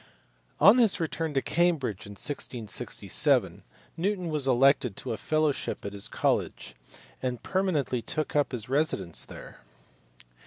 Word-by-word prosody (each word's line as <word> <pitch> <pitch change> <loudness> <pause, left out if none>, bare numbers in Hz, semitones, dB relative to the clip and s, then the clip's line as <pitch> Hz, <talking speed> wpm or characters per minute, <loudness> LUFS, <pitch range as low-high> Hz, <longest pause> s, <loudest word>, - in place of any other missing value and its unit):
On 215 +6 +7
his 225 -5 +4
return 160 -2 -2
to 135 - +1
Cambridge 155 - 0
in 100 - -9
1667 115 -2 -1 0.4
Newton 185 0 -1
was 150 -3 0
elected 130 -4 +3
to - - -4
a - - -2
fellowship 155 -7 -1
at 100 - -5
his 100 -1 -1
college, - - -1 0.5
and 125 -2 -3
permanently 165 -10 0
took 150 +7 -3
up 145 -1 +2
his 115 -4 -5
residence 130 - 0
there. - - -12
145 Hz, 130 wpm, -28 LUFS, 120-165 Hz, 0.5 s, On